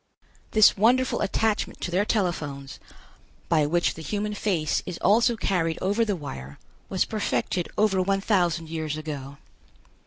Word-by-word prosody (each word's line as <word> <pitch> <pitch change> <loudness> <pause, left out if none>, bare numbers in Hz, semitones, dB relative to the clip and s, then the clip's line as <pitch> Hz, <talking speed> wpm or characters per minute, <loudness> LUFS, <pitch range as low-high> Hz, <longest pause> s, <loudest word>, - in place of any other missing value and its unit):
This 215 -1 +6
wonderful 245 +5 +2
attachment 215 +1 0
to 175 - -3
their 190 +4 +2
telephones, 150 -10 -2 0.7
by 155 -3 +3
which 170 +3 +1
the 160 - -10
human 210 +5 -3
face 180 -7 0
is 180 -2 -4
also 235 +3 +3
carried 165 -6 0
over 205 +5 +1
the 210 -3 0
wire, 70 - -8 0.3
was 190 - +1
perfected 200 -4 -2
over 205 -3 +3
one 195 +1 +1
thousand 175 -5 +1
years 155 -2 -3
ago. 140 -3 -6
180 Hz, 145 wpm, -25 LUFS, 155-210 Hz, 0.7 s, This